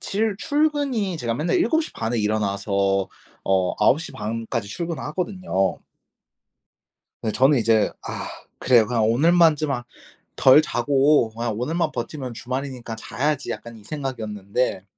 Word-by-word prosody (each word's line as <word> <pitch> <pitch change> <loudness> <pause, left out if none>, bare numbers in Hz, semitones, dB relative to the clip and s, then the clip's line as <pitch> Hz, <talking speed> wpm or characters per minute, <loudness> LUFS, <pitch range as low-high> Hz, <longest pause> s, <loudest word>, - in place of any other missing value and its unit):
칠 210 0 -1
출근이 285 - 0
제가 120 -6 -2
맨날 155 - 0
7 330 -2 +2
시 - - -8
반에 115 +1 -2
일어나서 100 -2 0 0.4
어 95 -1 +2
9 150 - +4
시 170 - -7
반까지 115 0 -4
출근을 170 +5 -4
하거든요. 175 - -1 1.4
네 110 - -1
저는 135 +4 +4
이제 110 -1 +3 0.2
'아 - - -5 0.3
그래. 120 -4 +5
그냥 115 -1 0
오늘만 165 +5 +5
좀 155 0 -2
아 120 -3 -2 0.5
덜 135 +4 +6
자고 145 -4 +2
그냥 115 0 -3
오늘만 165 +7 -1
버티면 125 +1 -5
주말이니까 125 -1 -5
자야지.' 140 +5 -2
약간 115 -1 -8
이 105 - -16
생각이었는데 110 -6 -3
125 Hz, 280 characters per minute, -23 LUFS, 110-155 Hz, 1.4 s, 덜